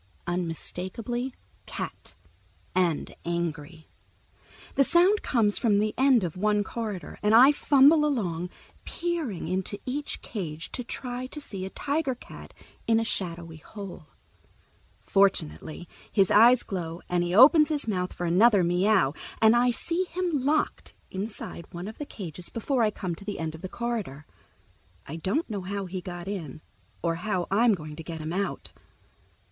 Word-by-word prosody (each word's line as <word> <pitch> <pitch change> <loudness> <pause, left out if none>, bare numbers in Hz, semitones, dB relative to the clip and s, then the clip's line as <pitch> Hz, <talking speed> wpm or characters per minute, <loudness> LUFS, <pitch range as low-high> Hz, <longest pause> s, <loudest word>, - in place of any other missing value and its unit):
Unmistakably 185 +8 -3 0.4
Cat, - - -6 0.6
and 175 -4 0
angry. 165 -2 -4 0.9
The 275 - +4
sound 355 +8 +4
comes 215 -5 +2
from 215 -4 +3
the 210 +1 +1
end 260 -5 +4
of 170 -3 -3
one 210 +2 +2
corridor, 210 -4 -5
and 210 +1 +4
I 260 +5 +9
fumble 290 +1 +5
along, 180 - -1 0.3
peering 330 - -3
into 190 +3 -2
each 280 +3 -3
cage 160 -7 -5
to 250 - -4
try 250 +1 -5
to 300 - -7
see 195 -9 -6
a - - -7
tiger 285 +3 -1
cat - - -12 0.4
in 225 0 +4
a - - 0
shadowy 170 -6 -2
hole. 185 -1 -9 0.9
Fortunately 175 - 0 0.2
his 195 -3 +3
eyes 235 +4 +7
glow 175 -4 -5
and 175 -1 +1
he 175 +1 -1
opens 300 - +8
his 295 -5 -1
mouth 185 -4 -1
for 175 - -4
another 195 +3 +5
meow, 180 -3 +3 0.3
and 220 +1 +6
I 245 +1 +4
see 335 +9 0
him 355 -4 -1
locked 300 +3 0 0.2
inside 195 -3 -6
one 175 +2 -6
of 215 - -9
the 295 - -5
cages 180 -3 -6
before 245 +3 -1
I 220 - +4
come 185 -4 -4
to 165 - -8
the 205 0 -4
end 160 -1 -3
of 160 - -10
the 185 - -6
corridor. 215 - -4 0.8
I 160 - -6
don't 195 - -1
know 205 -4 -4
how 200 +1 -4
he 185 0 -5
got 175 0 -7
in 165 -8 -5 0.4
or 165 -1 0
how 180 -1 -1
I'm 220 +2 +4
going 155 -3 -8
to 165 - -7
get 165 0 -6
him 155 +2 -4
out. 200 +2 -3
200 Hz, 160 wpm, -27 LUFS, 175-245 Hz, 0.9 s, I